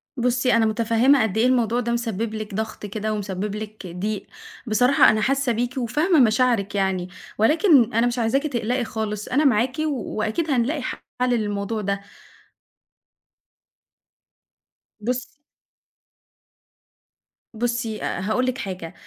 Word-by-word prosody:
بُصّي، 250 0 +1
أنا 230 -1 +4
متفهّمة 230 +5 +3
قد 220 -2 -2
إيه 225 - +3
الموضوع 240 -2 +2
ده 235 -1 -2
مسبِّب 230 -2 -2
لِك 215 -1 -6
ضغط 215 +1 -4
كده 215 +1 -3
ومسبِّب 200 0 -3
لِك 215 -2 -7
ضيق، 195 +4 -4 0.4
بصراحة 245 +5 +5
أنا 215 - +2
حاسة 270 +1 +1
بيكِ 245 +3 -2
وفاهمة 300 - +2
مشاعرِك 225 -4 +2
يعني، 190 -2 0 0.3
ولكن 290 - +4
أنا 230 +2 +3
مش 245 +1 -2
عايزاكِ 235 +5 +1
تقلقي 245 -1 -1
خالص، 215 -2 -4
أنا 280 +4 +1
معاكِ 250 0 +2
وأكيد 250 +2 -2
هنلاقي 270 +4 +1
حلّ - - -4 0.3
للموضوع 215 -2 -1
ده. 200 0 -2 3.0
بُصّي 245 +4 -2 2.3
بُصّي، 235 -1 -2
هاقول 215 +7 -1
لِك 255 0 -1
حاجة 185 -8 -6
225 Hz, 125 wpm, -23 LUFS, 210-250 Hz, 3.0 s, بصراحة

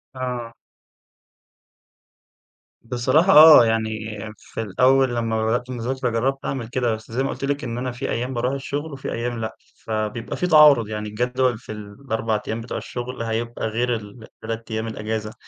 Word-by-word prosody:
آه. 125 -2 -4 2.3
بصراحة 130 +10 +3
آه، 155 -5 +10
يعني 110 -1 -2 0.2
في - - -7
الأول 130 +4 +3
لمّا 115 -1 0
بدأت 120 +3 0
مذاكرة 125 +1 -2
جرّبت 130 +4 -1
أعمل 130 -4 -3
كده، 120 -1 0
بس 110 0 -13
زي 125 +4 0
ما 135 - -1
قلت - - -4
لِك 145 +1 -1
إن 120 -2 -4
أنا 125 +1 -2
في 125 +3 -5
أيام 125 +3 -2
باروح 125 +2 -1
الشغل 145 +2 -4
وفي 135 - -5
أيام 120 0 -3
لأ، 110 0 -4 0.2
فبيبقى 110 +1 -4
في 180 - 0
تعارض 150 -9 +7
يعني 105 0 -4
الجدول 125 +2 0
في 115 - -11
ال4 110 +1 -3
أيام 110 +1 -3
بتوع 115 - -5
الشغل، 125 0 -6
هيبقى 115 0 -2
غير 120 +2 0
ال3 115 +1 -8
أيام 110 +1 -2
الأجازة، 110 0 -4
120 Hz, 160 wpm, -22 LUFS, 110-130 Hz, 2.3 s, آه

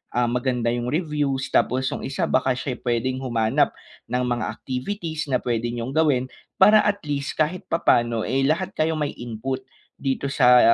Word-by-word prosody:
ah, 120 0 +2
maganda 125 0 0
'yong 120 0 -2
reviews, 145 -4 -1
tapos 130 +1 +2
yung - - -5
isa 135 - -1
baka 130 - +3
siya'y 130 -1 -4
pwedeng 125 +2 0
humanap 115 -3 +2 0.4
ng 125 +2 0
mga 120 -2 -1
activities 155 +4 -4
na 125 - +3
pwedeng 120 0 -1
niyong 115 +3 -4
gawin. 145 -5 +3 0.3
Para 210 +3 +8
at 205 -1 +1
least, 140 -1 -2
kahit 155 +4 0
papaano, 120 -8 +2
eh, 135 +4 +1
lahat 180 +5 0
kayo 160 +1 +1
may 150 -1 -2
input 120 +3 -4 0.3
dito 135 0 -2
sa, 125 -3 +6
130 Hz, 170 wpm, -23 LUFS, 120-150 Hz, 0.4 s, Para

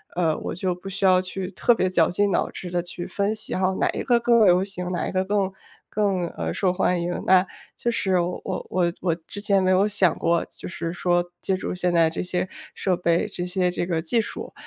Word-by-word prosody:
呃， 165 -3 +1
我 - - -5
就 180 +1 -1
不 180 +2 -11
需 195 +1 -4
要 185 -1 +5
去 185 0 -5
特 240 +4 +3
别 185 -4 +1
绞 170 -3 +3
尽 200 +3 +1
脑 - - +1
汁 180 - -7
地 175 0 0
去 175 0 -6
分 200 +3 -1
析， - - -6
然 185 - -1
后 190 0 +2
哪 - - +2
一 - - -2
个 240 -3 +3
更 235 -2 +4
流 180 0 +5
行， 180 -2 -5
哪 180 - -1
一 - - -5
个 185 0 0
更 195 -1 0 0.4
更， 195 -4 0
呃， 80 -1 -2
受 185 - +1
欢 180 -1 +1
迎。 175 +1 -2
那 185 0 +5 0.3
确 240 - -2
实 190 -5 +1
我 175 +1 -2 0.3
我 175 -2 +1
我 175 -3 +1
之 205 - -7
前 200 -2 +2
没 185 0 +2
有 190 +2 +4
想 195 -4 +2
过 170 0 +1
就 - - -9
是 170 -2 -4
说 175 0 +1 0.2
借 190 - 0
助 - - -4
现 180 -1 0
在 165 -1 +4
这 160 - -4
些 180 +1 -1 0.3
设 185 -2 0
备， 170 +3 +1
这 185 -4 -5
些 180 0 +1
这 175 - -2
个 170 -2 -1
技 225 +8 +1
术， 215 - -7
185 Hz, 260 characters per minute, -24 LUFS, 175-195 Hz, 0.4 s, 要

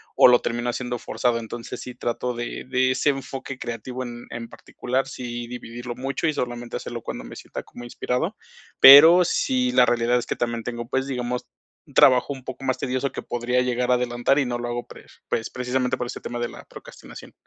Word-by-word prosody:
o - - +8
lo 125 -1 +6
termino 120 +1 -2
haciendo 125 0 -3
forzado, 120 0 0
entonces 115 +1 -7
sí, 125 - -8
trato 120 +1 -3
de 120 0 -5
de 130 0 +2
ese 130 - +1
enfoque 135 -1 -4
creativo 125 +2 -5
en 120 -1 -8
en 115 0 -6
particular, 130 +2 -3
sí 120 -3 -6
dividirlo 120 0 -7
mucho 135 +5 -2
y 155 - +1
solamente 120 -2 -4
hacerlo - - -6
cuando - - -6
me - - -10
sienta - - -8
como 120 - -12
inspirado. 125 - -2 0.4
Pero 160 +6 +10
sí 255 +7 +1
la - - +5
realidad 120 +1 +2
es - - -6
que - - -2
también 120 -1 -2
tengo, 120 0 -5
pues, 130 +2 -1
digamos, 125 -2 -3 0.4
un - - -19
trabajo 130 +2 +5
un 135 -2 -11
poco 130 +1 -8
más 130 -1 0
tedioso 130 +1 -2
que - - -6
podría 125 +1 0
llegar 125 0 -1
a - - +5
adelantar 125 +2 +1
y 140 - +1
no 120 -1 -2
lo 120 - -4
hago 120 0 -3
pre - - -13 0.2
pues 115 - -1
precisamente 125 0 -1
por 125 - -3
este - - -7
tema 120 - -5
de 120 0 -2
la - - -12
procrastinación. - - -12
125 Hz, 210 wpm, -24 LUFS, 120-130 Hz, 0.4 s, Pero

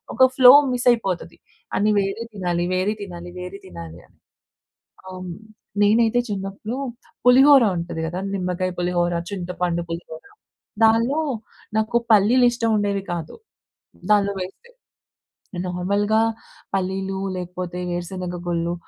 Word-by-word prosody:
ఒక 260 +3 +7
flow 255 -1 +9 0.2
miss 245 0 -2
అయిపోతది, 195 -7 -2 0.4
అని 210 +2 +2
వేరే 195 +3 -2
తినాలి, 175 -3 -1
వేరే 185 +3 +1
తినాలి, 175 -3 -8
వేరి 180 +2 -7
తినాలి 85 -1 -9
అని. - - -30 0.9
అవును. 185 -2 -7 0.5
నేనైతే 225 +3 +4
చిన్నప్పుడు 200 +4 -4 0.5
పులిహోర 265 +2 +7
ఉంటది 170 -1 -4
కదా! 175 +3 -4 0.2
నిమ్మకాయ 185 -1 -2
పులిహోర, 175 0 +1 0.2
చింతపండు 180 -2 -2
పులిహోర 165 -1 -7 0.6
దానిలో 230 +6 +4 0.6
నాకు 220 +2 +1
పల్లీలు 220 +5 +5
ఇష్టం 235 -1 -1
ఉండేవి 200 -1 0
కాదు 165 -3 -6 0.8
దానిలో 200 -1 +3
వేస్తే. 195 - -9 1.0
నార్మల్‍గా 200 +4 0 0.6
పల్లీలు 190 0 -2 0.2
లేకపోతే 180 0 -5
వేరుశెనగ 175 +1 -4
గుళ్ళు 170 0 -1
190 Hz, 110 wpm, -22 LUFS, 175-215 Hz, 1.0 s, flow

